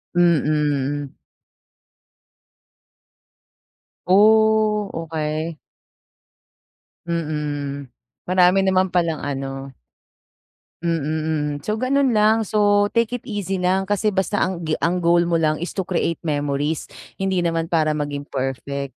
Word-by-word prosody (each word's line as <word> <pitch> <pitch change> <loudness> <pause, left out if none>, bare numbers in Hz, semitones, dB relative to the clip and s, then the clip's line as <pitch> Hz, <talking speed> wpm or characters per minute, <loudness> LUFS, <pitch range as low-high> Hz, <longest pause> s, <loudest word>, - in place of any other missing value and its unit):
Mm. 145 -4 +1 2.9
Oh, 215 +1 +4 0.2
okey. 155 0 -3 1.5
Mm. 150 -4 -3 0.4
Marami 185 +1 +4
naman 190 -1 +1
palang 170 -3 0
ano 135 -1 -5 1.1
Mm, 170 -1 +1
mm. 155 -1 -1
So, 215 +1 -2
gano'n 270 +3 +2
lang. 220 0 +3
So, 205 -1 +2
take 235 +1 0
it - - -31
easy 195 -3 -3
lang. 190 +2 +1
Kasi 205 +2 +1
basta 195 +1 -1
ang 180 -3 -1
gi 155 - -1
ang 175 +2 +1
goal 170 0 +2
mo 170 - +2
lang 155 0 0
is 175 - -5
to 190 - -1
create 170 -2 -1
memories 145 0 -1 0.3
hindi 190 -1 0
naman 165 -1 -1
para 155 -2 +2
maging 145 -1 -4
perfect. 135 0 -4
170 Hz, 110 wpm, -21 LUFS, 150-195 Hz, 2.9 s, Oh